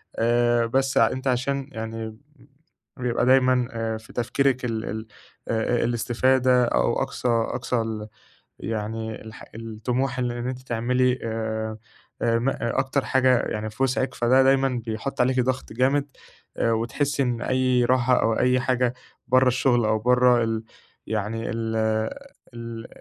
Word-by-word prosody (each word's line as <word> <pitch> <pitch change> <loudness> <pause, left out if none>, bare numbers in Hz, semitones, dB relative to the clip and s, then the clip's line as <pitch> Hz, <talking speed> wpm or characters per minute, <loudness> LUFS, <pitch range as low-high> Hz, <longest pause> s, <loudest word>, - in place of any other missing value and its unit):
آآ 120 0 +2
بس 135 +3 0
ع - - +5
أنتِ 130 +1 -4
عشان 135 +2 0
يعني 110 0 -5
ب 110 - -14 0.8
بيبقى 125 -1 0
دايمًا 130 -1 +4
أ 115 -1 -3
في 110 +1 -15
تفكيرِك 130 +1 0
ال 110 -2 -2
ال 110 +1 -5 0.4
أ 115 +1 0
الاستفادة 125 +2 +2
أو - - +1
أقصى 125 - -4
أقصى 120 +2 0
ال 110 -1 -4 0.5
يعني 110 0 -4
الح 110 0 -11
الطموح 120 +4 -3
إن 125 -1 0
إن 120 0 -4
أنتِ 130 -1 -4
تعملي 125 +1 +1
آآ 110 -1 -3 0.4
آآ 115 -1 +2
م 120 +4 -1
أكتر 130 +3 -1
حاجة 130 -1 +3
يعني 110 0 -3
في 110 - -4
وِسعِك. 130 0 0
فده 130 +3 +4
دايمًا 135 -2 +2
بيحُط 110 +5 -4
عليكِ 130 +1 +3
ضغط 130 +1 -2
جامد. 135 +4 +1 0.5
أ 115 - +2
وتحسّي 140 +6 0
إن 120 -3 -1
أي 130 -1 +2
راحة 125 0 +3
أو 115 0 +2
أي 125 0 +3
حاجة 125 -1 +1 0.3
برّه 130 +1 +5
الشغل 120 -2 +2
أو 110 0 +2
برّه 125 0 +4
ال 115 0 -2 0.4
يعني 110 +1 -2
ال 115 -1 -2 0.8
ال 115 0 -7
120 Hz, 150 wpm, -24 LUFS, 115-130 Hz, 0.8 s, ع